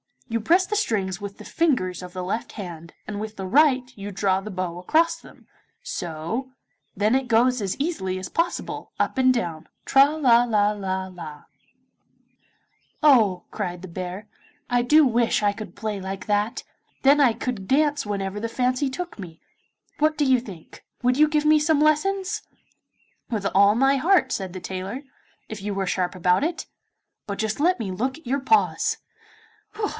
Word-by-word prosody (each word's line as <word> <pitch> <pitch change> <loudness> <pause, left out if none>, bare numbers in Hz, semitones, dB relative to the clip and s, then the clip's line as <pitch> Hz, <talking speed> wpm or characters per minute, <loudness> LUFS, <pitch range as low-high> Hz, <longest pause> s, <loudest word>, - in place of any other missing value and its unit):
you 230 - -1
press 350 - +3
the 420 - -3
strings 195 - -1
with 200 -1 -7
the - - -11
fingers 250 - 0
of 180 -1 -9
the 185 -1 -4
left 200 +5 -3
hand, 170 -4 -8
and 205 -1 -5
with 215 0 -6
the 190 - -5
right, 255 +3 +3
you 200 0 -7
draw 195 -1 +1
the 205 +2 -8
bow 180 -3 -4
across 330 - +2
them, - - -17 0.4
so 175 +10 -4 0.5
then 210 +4 +2
it 265 -1 0
goes 245 +1 +3
as 195 -1 -2
easily 275 - -2
as 185 - -6
possible, 335 +1 -3
up - - -1
and 255 -1 +5
down, 170 -9 -3 0.2
tra 275 0 +6
la 245 -6 +5
la 210 -3 +2
la 190 -2 -3
la 165 -5 -10 0.7
' - - -40
'Oh,' 220 -11 +5
cried 180 -4 -4
the 185 - -8
bear, 185 +4 -6 0.4
'I 245 0 +3
do 300 +5 +6
wish 235 -3 +2
I 205 - +4
could 215 +1 -9
play 215 -2 -3
like 190 +1 -6
that, 210 +3 0 0.4
then 280 +2 +6
I 260 -5 +5
could 220 -6 -4
dance 290 0 +2
whenever 200 -1 -3
the 230 +2 -3
fancy 255 +3 0
took 350 0 -6
me. 170 -4 -9 0.6
What 310 +1 +2
do 295 - +2
you 260 -2 +4
think? 195 -9 -12 0.2
Would 250 +1 +2
you 305 +1 +6
give 300 0 0
me 305 0 +6
some 300 0 +2
lessons?' 385 +7 +1 0.9
'With 215 -5 -2
all 200 +2 +5
my 270 +3 +3
heart,' 360 +7 +3
said 190 -3 -3
the 185 - -7
tailor, 190 +8 -5 0.5
'if 215 -2 -7
you 200 0 -4
are 195 - 0
sharp 180 -1 -1
about 180 +6 +2
it. 335 +2 -2 0.6
But 200 -1 -4
just 220 +2 -2
let 350 +2 +2
me 205 -5 -3
look 255 +9 -2
at 320 - -18
your 270 +3 0
paws. 435 +11 +2
220 Hz, 180 wpm, -24 LUFS, 190-275 Hz, 0.9 s, tra